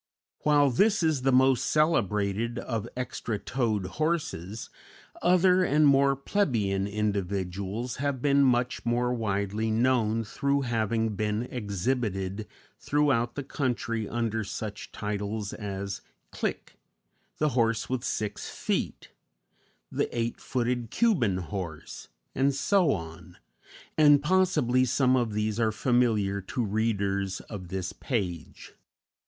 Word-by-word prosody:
While 145 -2 +4
this 200 - +3
is 155 -5 +2
the 135 +1 +2
most 130 -1 +4
celebrated 115 - +1
of 115 -2 -3
extra 125 -3 -3
toed 110 -4 -1
horses, 110 - -3 0.5
other 180 +1 +4
and 150 -2 +3
more 140 -1 +5
plebeian 115 - 0
individuals 100 +2 -2
have 140 -1 -1
been 140 +1 +3
much 125 -1 +2
more 120 +1 +1
widely 105 -1 -1
known 115 -1 +2
through 140 +6 0
having 115 -2 0
been 105 +2 -1
exhibited 105 -3 -2 0.3
throughout 135 -5 +1
the 145 - -3
country 115 -6 -2
under 115 -1 -1
such 105 0 -6
titles 105 0 -3
as 100 -1 -5 0.3
"Clique, - - -4 0.6
the 150 - +2
horse 115 -4 +1
with 130 -2 -2
six 105 -1 -3
feet," - - -3 0.8
"the - - 0
eight 115 0 -1
footed 120 -2 -1
Cuban 135 - +2
horse," 90 -4 -6 0.3
and 135 +1 +2
so 180 +2 +3
on; 80 -5 -6 0.6
and 145 -2 +6
possibly 150 -8 +3
some 130 +1 +3
of 120 -4 0
these 105 +1 -1
are 110 -1 +2
familiar 110 -4 +1
to 120 +5 -2
readers 100 -3 -1
of 95 -4 -8
this 95 0 -4
page. 95 - -4
115 Hz, 120 wpm, -28 LUFS, 100-135 Hz, 0.8 s, and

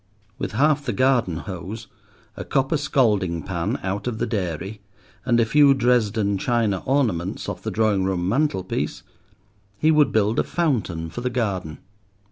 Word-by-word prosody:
With - - -3
half 145 +5 +2
the 125 -4 -2
garden 120 -7 +2
hose, 100 +4 -6 0.5
a - - -6
copper 135 +4 0
scalding 105 - +1
pan 85 -3 -2
out 100 +4 -3
of 120 -3 -2
the - - -1
dairy, 95 0 -4 0.5
and 120 -1 +3
a 115 - +4
few 140 +3 +5
Dresden 110 -5 +1
china 115 -5 0
ornaments 110 -11 0
off - - -5
the - - -3
drawing 105 -4 +1
room 90 -2 -1
mantelpiece, 100 -5 -1 0.7
he 155 +9 +3
would 150 -3 +4
build 110 +1 +2
a - - +3
fountain 105 - -1
for 120 - -6
the 125 - -1
garden. 95 - -2
110 Hz, 155 wpm, -23 LUFS, 95-130 Hz, 0.7 s, few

